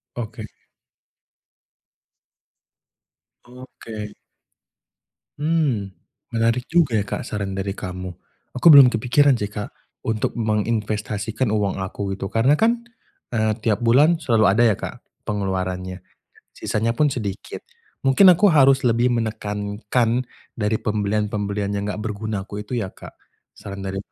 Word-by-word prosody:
Oke. 120 Hz, -3 st, -6 dB, 3.0 s
Oke. 115 Hz, -4 st, -9 dB, 1.2 s
Mmm, 145 Hz, -, 0 dB, 0.4 s
menarik 115 Hz, +2 st, +1 dB
juga 165 Hz, -10 st, +2 dB
ya 100 Hz, -, 0 dB
Kak -, -, -4 dB
saran 100 Hz, -5 st, -4 dB
dari 95 Hz, +1 st, -4 dB
kamu. 90 Hz, 0 st, -6 dB, 0.5 s
Aku 125 Hz, -, +3 dB
belum 140 Hz, -3 st, +10 dB
kepikiran 125 Hz, +3 st, +3 dB
sih 105 Hz, -, -2 dB
Kak, 105 Hz, 0 st, -5 dB, 0.3 s
untuk 110 Hz, -1 st, -2 dB
menginvestasikan 110 Hz, 0 st, -1 dB
uang 100 Hz, -3 st, 0 dB
aku 95 Hz, +1 st, -4 dB
gitu. -, -, -5 dB
Karena 130 Hz, +6 st, +3 dB
kan, 235 Hz, +4 st, +2 dB, 0.5 s
eee, 110 Hz, -2 st, +1 dB
tiap 115 Hz, +1 st, 0 dB
bulan 145 Hz, +8 st, +5 dB
selalu 115 Hz, -8 st, +2 dB
ada 110 Hz, +5 st, +3 dB
ya 110 Hz, -, +4 dB
Kak, -, -, -7 dB, 0.3 s
pengeluarannya, 95 Hz, -2 st, -3 dB, 0.5 s
sisanya 115 Hz, +2 st, -1 dB
pun 150 Hz, +5 st, +2 dB
sedikit. 105 Hz, -8 st, -5 dB, 0.4 s
Mungkin 135 Hz, +9 st, +6 dB
aku 185 Hz, +2 st, +6 dB
harus 135 Hz, -3 st, +5 dB
lebih 120 Hz, +1 st, +3 dB
menekankan 110 Hz, +1 st, -1 dB, 0.3 s
dari 110 Hz, 0 st, -1 dB
pembelian-pembelian 105 Hz, -1 st, -2 dB
yang 100 Hz, -, -2 dB
enggak 105 Hz, +1 st, -4 dB
berguna 105 Hz, -2 st, -4 dB
aku 100 Hz, +1 st, -7 dB
itu 105 Hz, +4 st, -5 dB
ya 100 Hz, -5 st, -3 dB
Kak. -, -, -13 dB, 0.4 s
Saran 100 Hz, 0 st, -8 dB
dari 95 Hz, 0 st, -4 dB
110 Hz, 120 wpm, -22 LUFS, 100-125 Hz, 3.0 s, belum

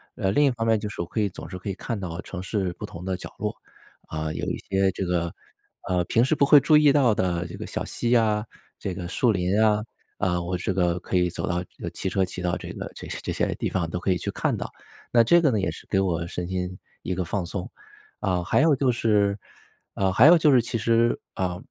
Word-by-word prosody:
呃， 95 Hz, -, 0 dB
另 145 Hz, +7 st, +4 dB
一 135 Hz, -, +4 dB
方 115 Hz, -2 st, -3 dB
面 110 Hz, -1 st, +3 dB
就 105 Hz, -, -4 dB
是 105 Hz, -, -5 dB
我 -, -, -2 dB
可 110 Hz, -, -3 dB
以 105 Hz, -, +2 dB
总 90 Hz, -, -9 dB
是 90 Hz, -, -6 dB
可 95 Hz, +2 st, -6 dB
以 -, -, -1 dB
看 115 Hz, +2 st, -4 dB
到 90 Hz, -1 st, -5 dB
城 90 Hz, -1 st, -7 dB
市 95 Hz, -2 st, -1 dB
不 -, -, -4 dB
同 85 Hz, +2 st, -9 dB
的 95 Hz, -1 st, -2 dB
角 -, -, -9 dB
落， -, -, -1 dB, 0.5 s
啊， 80 Hz, 0 st, -3 dB
有 -, -, -4 dB
一 -, -, -2 dB
些 95 Hz, 0 st, +3 dB
这 95 Hz, -, -3 dB
个 85 Hz, -1 st, -1 dB, 0.6 s
呃， 90 Hz, -1 st, +2 dB
平 115 Hz, +7 st, +3 dB
时 140 Hz, -, +2 dB
不 140 Hz, -, +3 dB
会 145 Hz, -1 st, +7 dB
注 155 Hz, -2 st, +5 dB
意 150 Hz, -2 st, +6 dB
到 130 Hz, -7 st, +4 dB
的 90 Hz, -3 st, 0 dB
这 85 Hz, -, -8 dB
个 -, -, -6 dB
小 -, -, -3 dB
溪 120 Hz, +1 st, 0 dB
啊， 110 Hz, -1 st, +2 dB, 0.3 s
这 95 Hz, -, -3 dB
个 90 Hz, -2 st, -5 dB
树 115 Hz, +5 st, +2 dB
林 95 Hz, +2 st, +1 dB
啊， 105 Hz, -1 st, +3 dB, 0.3 s
啊， 90 Hz, -3 st, 0 dB
我 90 Hz, +1 st, -2 dB
这 90 Hz, +2 st, -2 dB
个 90 Hz, -1 st, +1 dB
可 90 Hz, -, -4 dB
以 90 Hz, 0 st, +2 dB
走 -, -, -4 dB
到 90 Hz, -1 st, 0 dB, 0.3 s
呃， -, -, -2 dB
骑 -, -, -3 dB
车 95 Hz, -1 st, +1 dB
骑 90 Hz, 0 st, -7 dB
到 90 Hz, -1 st, 0 dB
这 -, -, -8 dB
个 -, -, -6 dB
这 -, -, -8 dB
些 -, -, -5 dB
这 -, -, -3 dB
些 -, -, 0 dB
地 -, -, -2 dB
方 85 Hz, -3 st, -1 dB
都 90 Hz, -, -3 dB
可 95 Hz, -, +1 dB
以 90 Hz, -, +2 dB
去 -, -, -4 dB
看 -, -, 0 dB
到。 -, -, -5 dB, 0.4 s
那 115 Hz, -1 st, +7 dB
这 170 Hz, +9 st, +5 dB
个 150 Hz, -, +4 dB
呢， 110 Hz, -, +1 dB
也 -, -, 0 dB
是 -, -, -12 dB
给 95 Hz, -, +2 dB
我 85 Hz, -3 st, 0 dB
身 90 Hz, 0 st, -4 dB
心 90 Hz, 0 st, -3 dB, 0.3 s
一 90 Hz, -, -2 dB
个 90 Hz, -, -1 dB
放 95 Hz, 0 st, -2 dB
松。 90 Hz, +1 st, -5 dB, 0.5 s
啊， 90 Hz, -2 st, 0 dB
还 95 Hz, -, +2 dB
有 155 Hz, -3 st, +5 dB
就 130 Hz, -2 st, +2 dB
是 105 Hz, -3 st, +2 dB, 0.6 s
啊， 95 Hz, -1 st, +1 dB
还 115 Hz, +10 st, +7 dB
有 170 Hz, +1 st, +9 dB
就 150 Hz, -2 st, +4 dB
是 125 Hz, -3 st, +6 dB
其 120 Hz, 0 st, -3 dB
实， 115 Hz, +1 st, +2 dB
啊， 90 Hz, -1 st, -2 dB
95 Hz, 280 characters per minute, -25 LUFS, 90-115 Hz, 0.6 s, 有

